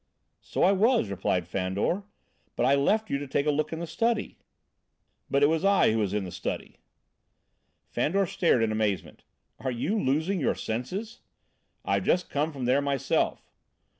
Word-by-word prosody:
"So - - -2
I - - +6
was," 210 - +3
replied 90 -3 -1
Fandor, 95 - -1 0.5
"but 120 - +1
I 135 - +4
left 205 +10 +2
you 140 - 0
to 145 - -6
take 140 +2 0
a 150 - +3
look 150 +1 -1
in 160 - -3
the 170 - -4
study." 225 +6 -1 0.9
"But 140 +1 +2
it - - +9
was 160 +3 +1
I 195 - +4
who 110 - +1
was 100 -3 0
in 105 -1 -1
the 90 - -6
study!" - - -5 1.1
Fandor 195 +6 0
stared 165 -8 +2
in 110 - +1
amazement. 110 -3 -2 0.4
"Are 130 - -2
you 155 - -1
losing 160 +8 +1
your 140 - +1
senses?" 185 - -4 0.7
"I've - - +1
just 180 - +1
come 150 +3 0
from 135 -4 -5
there 130 +3 +3
myself!" 140 -2 -1
140 Hz, 170 wpm, -27 LUFS, 115-185 Hz, 1.1 s, it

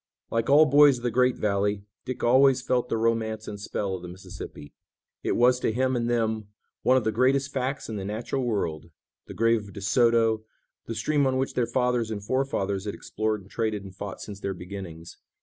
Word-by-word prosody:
Like 115 +2 0
all 150 +3 +7
boys 145 -2 +6
of 120 - -11
the 120 - 0
great 125 +2 +3
valley, 100 0 0 0.2
Dick 130 - -5
always 130 +1 +5
felt 125 -1 0
the - - 0
romance 110 -1 0
and 105 - -6
spell 100 -1 -3
of 95 - -4
the 90 - -8
Mississippi. 90 -4 -10 0.5
It - - 0
was 125 +1 +4
to 115 - 0
him 130 +3 +1
and 120 -1 0
them 110 -3 0 0.3
one 130 +1 +4
of 130 - +1
the 110 - +1
greatest 130 +4 +2
facts 130 +1 -2
in 110 - -4
the 100 - -4
natural 110 +6 -3
world, 85 -9 -2 0.4
the - - -9
grave 115 0 +3
of 100 - -13
De 100 - -8
Soto, 115 0 +3 0.4
the 115 - -4
stream 145 +5 +1
on 130 0 +1
which 135 +1 -1
their 120 -2 +1
fathers 125 -1 +1
and 105 -2 -4
forefathers 105 -7 -1
had 105 - -3
explored 110 -1 -2
and 95 - -18
traded 110 -3 -1
and 95 -1 -11
fought 100 0 -6
since 100 -2 -8
their 100 -1 -3
beginnings. 90 -3 -8
115 Hz, 210 wpm, -26 LUFS, 100-125 Hz, 0.5 s, all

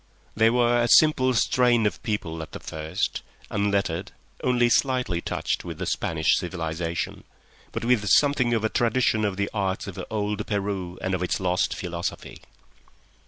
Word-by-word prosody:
They 110 +1 +5
were 120 0 +3
a 120 - +2
simple 130 -2 +5
strain 120 -1 +3
of 105 - -1
people 85 -7 -3
at 80 - -9
the - - -6
first, 80 +3 -3 0.3
unlettered, 100 -2 -1 0.3
only 125 -1 +3
slightly 125 -8 +1
touched - - -2
with - - -7
the - - -4
Spanish 80 -1 +1
civilisation, 85 -1 -3 0.5
but 115 0 -4
with 115 -5 +2
something 130 -1 +4
of 110 - -1
a - - +3
tradition 115 -2 +1
of 100 -2 -1
the 100 0 0
arts 95 -3 -1
of 95 - -6
old 105 -1 -2
Peru 100 -3 -3
and 95 - -1
of 90 - -1
its 90 - -1
lost 90 -1 0
philosophy. 85 -1 -5
105 Hz, 160 wpm, -25 LUFS, 90-120 Hz, 0.5 s, They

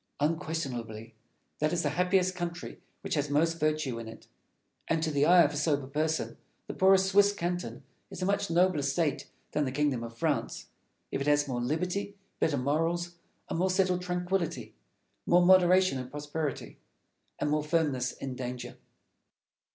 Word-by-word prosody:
Unquestionably 135 -8 -3 0.5
that 155 +1 +1
is 175 -1 0
the 145 - 0
happiest 180 +3 +2
country 175 -1 -6 0.2
which - - -4
has 145 -2 0
most 165 +3 +1
virtue 155 -5 0
in 115 - -7
it; 110 0 -11 0.6
and 165 -1 0
to 160 - 0
the 145 0 +2
eye 175 0 +7
of 150 +1 0
sober 145 -2 0
reason 155 +1 -1 0.3
the - - -6
poorest 190 0 +5
Swiss 205 +1 +5
canton 175 -5 -4 0.3
is - - -8
a 185 - -1
much 200 +1 0
nobler 175 -2 +3
state 140 +2 -1 0.2
than 150 - +1
the 130 - -2
kingdom 140 -3 0
of 115 0 -8
France, - - -2 0.4
if 135 - -2
it 140 - -2
has 145 0 +3
more 125 -2 -2
liberty, 180 +10 -2 0.2
better 150 -3 +1
morals, 165 +6 -1 0.3
a - - -4
more 185 +3 +1
settled 185 -1 +1
tranquillity, 180 0 -2 0.5
more 175 0 +5
moderation 185 -4 +5
in 125 0 -6
prosperity, 150 0 -5 0.6
and 150 - -1
more 150 0 +1
firmness 150 -6 0
in 135 -1 -6
danger. 125 -1 -6
160 Hz, 160 wpm, -29 LUFS, 140-180 Hz, 0.6 s, eye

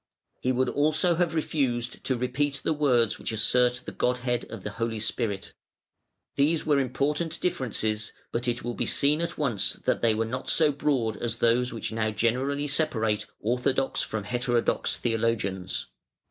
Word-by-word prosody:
He 130 - 0
would 130 0 +1
also 155 +4 +3
have 170 -1 0
refused 125 -6 -1
to 130 - +1
repeat 135 +3 -1
the - - +1
words 125 -7 +2
which - - -3
assert 125 +3 +2
the - - -5
Godhead 125 -1 0
of 110 -5 -9
the 105 - -4
Holy 115 0 -2
Spirit. 105 -2 -2 0.8
These 155 +3 +2
were 145 -2 +3
important 150 +5 -1
differences, 110 - -1 0.2
but 120 +1 -2
it 120 0 -1
will 120 +1 -3
be - - -2
seen 150 +3 +3
at 170 - -3
once 125 -10 +1
that - - -1
they 115 -2 +3
were 115 +1 0
not 125 +3 -4
so 155 -2 +4
broad 135 -6 0
as 120 - -2
those 120 +2 +2
which 115 -1 -4
now 110 -1 0
generally 125 +7 0
separate 130 -8 0
"orthodox" 125 +4 0
from 110 -2 -3
"heterodox" 120 +1 0
theologians. 110 -5 -1
125 Hz, 160 wpm, -27 LUFS, 115-140 Hz, 0.8 s, so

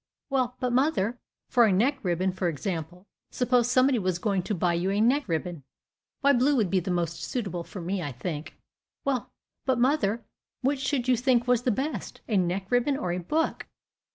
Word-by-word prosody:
"Well, 255 -2 +1
but, 250 -1 -1
mother, 245 -4 +1 0.3
for 240 -2 +5
a 215 - +3
neck 250 +9 +2
ribbon, 185 -1 0
for 185 0 -2
example; 170 +2 -4 0.2
suppose 245 -1 +2
somebody 255 0 +4
was 185 -3 0
going 195 0 0
to 210 +4 -2
buy 175 0 +1
you 175 +3 0
a 200 +1 +1
neck 255 +5 +3
ribbon." 170 -1 -2 0.6
"Why, 280 0 +5
blue 270 +3 +3
would 215 -8 +1
be 190 - +3
the 185 - -5
most 170 -2 -1
suitable 195 -8 -3
for 185 - -8
me, 185 +2 -2
I 145 -4 -3
think." 150 +5 -5 0.5
"Well, 270 -3 -1 0.3
but 260 -2 +1
mother, 240 -4 +1 0.4
which 275 +2 +1
should 265 -2 -1
you 255 - +5
think 245 0 +2
was 245 -1 +3
the 245 - +1
best, 265 - -3
a 220 - 0
neck 190 +1 0
ribbon 250 +3 +2
or 180 - -2
a 180 - -1
book?" 310 - -1
220 Hz, 195 wpm, -27 LUFS, 180-255 Hz, 0.6 s, for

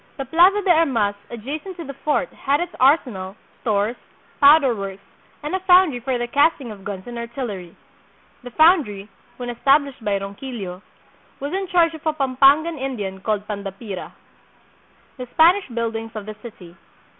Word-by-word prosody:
The 270 - -4
Plaza 365 +8 +4
de 370 - +3
Armas 265 -12 +2 0.2
adjacent 295 - -7
to 340 - -6
the 275 - -7
fort 300 - -1
had 280 +1 0
its 350 0 -4
ar 275 +5 +6
senal, 190 -5 -7 0.3
stores, 215 0 0 0.4
powder 280 -2 +6
works, 195 -1 -7 0.4
and 295 - -4
a 375 - 0
foundry 365 -7 +4
for 250 +1 -2
the 240 - -2
cast 285 +7 +2
ing 245 -5 -8
of 200 -2 -11
guns 190 -2 -6
and 240 -1 -7
artillery. 230 -7 -6 0.7
The 245 - -9
foundry, 250 - +3 0.3
when 245 -1 -5
established 275 +1 +1
by 205 -2 0
Ronquillo, 195 -2 -7 0.6
was 285 +4 -5
in 385 0 -2
charge 345 -3 +3
of 315 - -10
a 310 - +2
Pampangan 280 +3 +3
Indian 210 -8 -4
called 210 +1 -2
Pandapira. 200 -1 -6 1.1
The 250 -1 -7
Spanish 350 +5 +5
Buildings 225 -2 -4
of 210 -2 -6
the 215 - -6
City. 180 -7 -12
250 Hz, 165 wpm, -21 LUFS, 210-310 Hz, 1.1 s, ar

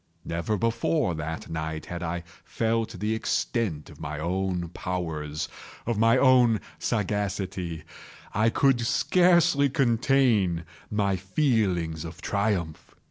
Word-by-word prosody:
Never 85 +6 -1
before 115 - +1
that 80 0 -5
night 80 -1 -4
had 85 -1 -6
I 85 0 -3 0.2
felt 115 0 -1
the 105 +1 0
extent 110 -6 -1
of 75 - -15
my 75 -1 -5
own 90 +1 -1
powers—of 80 +5 -4
my 115 +1 +5 0.2
sagacity. 95 -5 -2 0.5
I 110 +2 +3
could 130 +1 +3
scarcely 170 +2 +4
contain 120 - +2 0.3
my 100 -2 +1
feelings 95 - 0
of 85 +1 -8
triumph. 100 -6 -2
100 Hz, 105 wpm, -27 LUFS, 85-115 Hz, 0.5 s, my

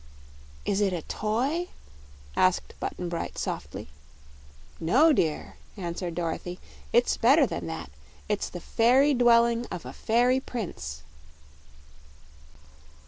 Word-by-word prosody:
"Is 195 - +1
it 195 -2 +2
a 170 -3 -3
toy?" 260 +12 -1 0.7
asked 185 -1 +2
Button 180 - -4
Bright 170 -1 -4
softly. - - -4 0.9
"No, 260 - +5
dear," 160 - -1 0.2
answered 175 -2 -4
Dorothy; 175 +1 -3 0.3
"it's - - +3
better - - +5
than 85 0 -4
that. 80 -3 -6 0.4
It's - - -1
the - - -7
fairy 260 +6 +4
dwelling 235 -1 +4
of 175 - -7
a - - -7
fairy 245 +3 +2
prince." 120 - -6
205 Hz, 110 wpm, -27 LUFS, 170-245 Hz, 0.9 s, No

